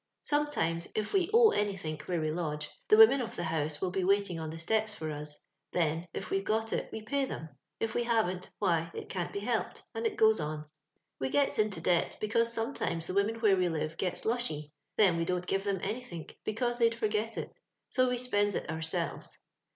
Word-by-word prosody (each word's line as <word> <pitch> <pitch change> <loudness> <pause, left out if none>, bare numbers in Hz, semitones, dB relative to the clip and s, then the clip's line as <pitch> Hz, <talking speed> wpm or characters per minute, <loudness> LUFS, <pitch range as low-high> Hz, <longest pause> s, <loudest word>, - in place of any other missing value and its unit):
Sometimes, 230 - 0
if 215 -1 -1
we 370 -3 +3
owe 460 -1 +7
anythink 190 -7 -1
where 175 -2 0
we 155 -1 0
lodge, 150 -3 -2 0.2
the 215 - +6
women 235 +5 +8
of 235 - -5
the - - -3
house 155 -2 -1
will 185 +1 -1
be 190 0 0
waiting 195 -2 +2
on 160 -1 -4
the 160 - -6
steps 215 +5 0
for 155 -4 -4
us: 150 0 -4 0.4
then, 165 0 0
if - - -6
we've 195 0 +1
got 220 +2 0
it, - - -2
we 220 - -6
pay 275 +5 0
them; 160 -10 -6 0.3
if 225 0 -1
we 240 - +1
havent, 215 -6 0
why 170 -4 +1
it - - -6
can't 175 -2 -3
be 200 - -4
helped, 225 +1 -2
audit 225 0 -1
goes 220 -2 +5
on. 150 0 -3 0.5
We 130 - -1
gets 280 - +2
into 210 -6 +1
debt, 175 0 +1
because 230 +2 +2
sometimes 225 -7 -1
the 185 - -4
women 200 +3 +2
where 210 -4 +5
we 180 -1 +2
live 155 0 -2
sets 180 -2 -2
lushy; 155 -11 -1 0.2
then 190 -6 +5
we 165 - +1
don't 180 +1 -1
give 195 +1 0
them 200 -2 0
anythink, 200 -6 -5
because 240 +3 -1
they'd 230 -1 +4
forget 220 0 -1
it, - - -4 0.4
so 255 -1 +3
we 250 - 0
spends 205 -5 +1
it - - -3
our 160 - -4
selves. 160 0 -3
195 Hz, 210 wpm, -31 LUFS, 165-225 Hz, 0.5 s, women